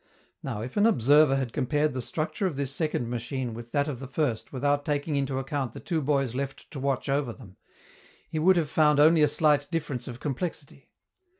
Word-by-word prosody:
Now, 105 - -4
if 125 - -6
an 205 +2 +5
observer 145 - +5
had 130 -4 -2
compared 145 +2 +1
the 130 - -3
structure 160 - -2
of 170 - -4
this 140 -1 -2
second 150 -5 -1
machine 120 +1 -3
with 120 +1 -9
that 145 0 +1
of 140 -5 -4
the 135 - -7
first 130 -5 -2
without 145 +2 0
taking 145 +1 -1
into 135 -1 -1
account 135 -2 -3
the - - -8
two 165 -4 -2
boys 135 -3 0
left 135 +1 -5
to 140 - -6
watch 135 0 -1
over 135 -2 0
them, 110 -6 -14 0.7
he 155 - -3
would 185 +3 +5
have 165 -3 +1
found 150 0 +3
only 160 +2 +6
a 150 - +6
slight 145 -1 +2
difference 150 -7 -3
of 120 -1 -7
complexity. 145 0 -5
140 Hz, 205 wpm, -27 LUFS, 130-150 Hz, 0.7 s, only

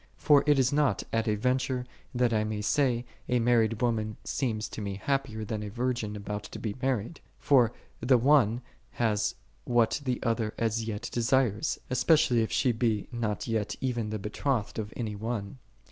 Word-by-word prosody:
For 145 -2 +5
it 145 -1 +5
is 130 0 +2
not 145 -1 +2
at 115 0 +1
a 105 - +2
venture 125 +2 0 0.3
that 120 -1 +2
I 110 -1 +2
may 110 -1 -3
say, 125 0 +1 0.2
a 125 - +3
married 115 -1 +2
woman 110 -3 0
seems 110 -5 -2
to - - -6
me 100 -1 -3
hap 135 +6 0
pier 110 -3 -6
than 105 0 -3
a 105 - -5
virgin 120 -1 -2
about 105 0 -4
to - - -8
be 105 -3 -4
married: 130 +3 -1 0.2
for 125 -5 +4 0.3
the 125 +2 +4
one 120 -3 +4 0.3
hath 105 -3 0 0.3
what 120 +2 +2
the 125 -3 -1
other 115 -2 -1
as 115 0 0
yet 105 -2 -4
desires, 120 -3 +1
especially 125 -1 +4
if 110 - -1
she 125 - +2
be 110 -3 0
not 115 -3 -2
yet 110 -3 -1
even 120 -4 -2
the 110 - -2
betrothed 105 +3 -2
of 105 -1 -4
any 110 -4 -3
one. 110 +1 -4
115 Hz, 180 wpm, -29 LUFS, 110-125 Hz, 0.3 s, For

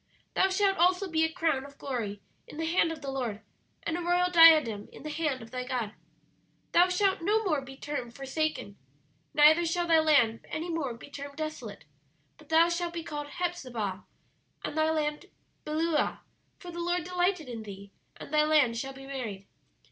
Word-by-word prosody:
"'Thou 380 - +3
shalt 390 0 +2
also 360 +3 +3
be 320 -2 +1
a 320 - +1
crown 320 -6 0
of 280 0 -13
glory 225 -7 -4 0.3
in - - -11
the 325 - -2
hand 330 0 +2
of 315 -2 -7
the 275 - -3
Lord, 245 -6 -3 0.4
and 330 - -2
a 350 - -3
royal 355 +1 +2
diadem 310 - +6
in - - -12
the 305 - -5
hand 295 -5 -2
of 225 - -13
thy 250 0 -3
God. 240 -4 -3 0.8
"'Thou 355 +1 +5
shalt 380 +1 +1
no 425 +6 +2
more 310 -8 +1
be 270 0 -11
termed 260 -5 -5
Forsaken; 275 -6 -3 0.6
neither 310 +3 +7
shall 345 +1 0
thy 330 -1 +5
land 280 -8 +3
any 325 +2 -4
more 285 -7 -2
be 245 - -13
termed 280 0 -8
Desolate: 310 - -6 0.5
but 305 - -18
thou 325 +1 +6
shalt 345 0 -2
be 335 - -3
called 295 -2 -5
Hephzibah, 255 - -3 0.6
and - - -5
thy 315 0 +2
land 300 -1 -1 0.4
Beulah: 310 0 0 0.4
for 355 - -9
the 345 0 -5
Lord 350 0 0
delighted 360 -2 0
in 235 -2 -6
thee, 200 -1 -10 0.3
and 280 - -10
thy 305 - +5
land 295 -7 +3
shall 270 +2 -5
be 270 0 -11
married. 230 -8 -5
305 Hz, 185 wpm, -29 LUFS, 260-340 Hz, 0.8 s, neither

